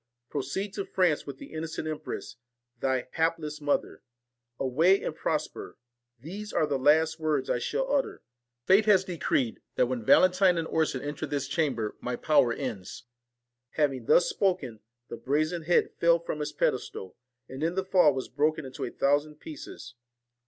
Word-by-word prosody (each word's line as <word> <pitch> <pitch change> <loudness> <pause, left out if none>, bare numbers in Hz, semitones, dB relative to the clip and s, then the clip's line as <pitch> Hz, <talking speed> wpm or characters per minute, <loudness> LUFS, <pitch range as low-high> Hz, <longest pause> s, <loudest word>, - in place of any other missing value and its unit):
Proceed 150 +9 -3
to 200 - -3
France 175 -7 +1
with 140 -2 -6
the - - -11
innocent 160 0 -4
empress, 155 -6 -6 0.4
thy 130 -1 0
hapless 160 -2 -1
mother. 145 0 -1 0.6
Away, 160 +9 +3
and 155 - -3
prosper! 155 -1 -3 0.4
These 200 - -7
are - - +2
the 140 -3 -1
last 160 +4 +3
words 150 -4 0
I - - +1
shall 265 - -2
utter. 280 -2 -1 0.4
Fate 200 +3 +5
has 195 -3 +6
decreed, 145 -9 -1
that - - +3
when 125 -2 -3
Valentine 185 - +5
and 165 -1 -1
Orson 155 -5 0
enter 150 +1 -4
this 140 -2 -2
chamber, 135 -8 -1
my 125 0 -2
power 130 -3 +3
ends.' 115 -8 -5 0.7
Having 135 -6 0
thus 175 - +5
spoken, 175 - -1 0.3
the - - -7
brazen 155 +4 -1
head 175 - +3
fell 170 0 +5
from 165 -2 -5
its 150 - -3
pedestal, 95 -1 -2 0.3
and 130 +2 -8
in 165 +3 0
the 190 0 -1
fall 180 -5 +5
was 130 -1 -4
broken 150 +3 0
into 130 - -7
a - - -2
thou 145 +1 +2
sand 150 0 -14
pieces. 135 -5 -9
155 Hz, 165 wpm, -28 LUFS, 135-170 Hz, 0.7 s, has